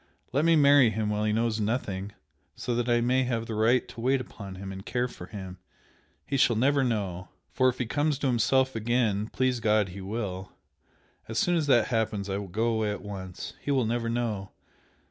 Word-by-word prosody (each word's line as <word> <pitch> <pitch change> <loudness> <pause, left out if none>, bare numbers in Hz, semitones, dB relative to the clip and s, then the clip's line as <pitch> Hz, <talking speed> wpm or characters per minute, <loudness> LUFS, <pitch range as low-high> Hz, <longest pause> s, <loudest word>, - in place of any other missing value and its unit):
Let 145 +4 +2
me 165 0 +5
marry 140 -4 +6
him 110 0 -1
while 105 0 0
he 105 - +1
knows 115 0 0
nothing, 105 -3 -2 0.4
so 120 - -3
that 120 +1 -1
I 120 0 +3
may 125 +2 +2
have 115 -2 -1
the 115 - -5
right 115 +3 +2
to 115 - -9
wait 130 +3 +2
upon 100 -6 -8
him 95 +1 -7
and 95 0 -8
care 125 +3 -1
for 90 -7 -10
him! 95 -3 -8 0.7
He 140 - -1
shall 125 -3 +4
never 135 +4 +3
know! 95 -7 -2 0.2
For 130 0 +3
if 125 - -4
he 125 - -1
comes 145 +4 0
to 140 - -4
himself 130 +1 +2
again 110 -2 +1
please 130 +1 0
God 105 -3 +2
he 95 +2 -8
will! 95 -2 -5 0.7
as 110 - -4
soon 175 +7 +2
as 160 -3 0
that 120 -5 +4
happens 105 -4 -1
I 100 - -1
will 100 - -6
go 110 +6 -1
away 110 -1 0
at 105 - -4
once. 95 -3 -7
He - - -6
will 135 -4 +2
never 115 +1 -1
know! 115 -5 -2
115 Hz, 210 wpm, -28 LUFS, 105-125 Hz, 0.7 s, marry